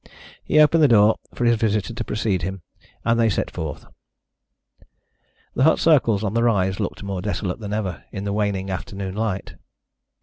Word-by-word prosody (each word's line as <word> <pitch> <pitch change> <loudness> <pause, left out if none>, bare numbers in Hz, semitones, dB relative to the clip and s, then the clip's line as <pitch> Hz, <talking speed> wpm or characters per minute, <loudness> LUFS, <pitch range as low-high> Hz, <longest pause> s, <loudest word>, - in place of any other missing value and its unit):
He 155 - +2
opened 155 +2 +5
the 150 - +7
door 110 -3 +5 0.2
for 120 - -1
his 120 -1 +4
visitor 110 0 0
to 115 - -4
precede 105 -4 -1
him, 95 +1 -5 0.4
and 115 0 +2
they 115 -1 +4
set 95 - -2
forth. 80 -3 -6 1.7
The - - -2
hut 160 +4 +5
circles 120 -10 +3
on 100 -1 -1
the 115 - +1
rise 95 -5 +1
looked - - -4
more 100 -2 -4
desolate 100 -1 -3
than 105 -2 -6
ever 100 -5 -3
in 100 - -5
the 100 0 -2
waning 100 -2 -1
afternoon 95 0 -5
light. 105 -2 -3
105 Hz, 175 wpm, -22 LUFS, 95-115 Hz, 1.7 s, the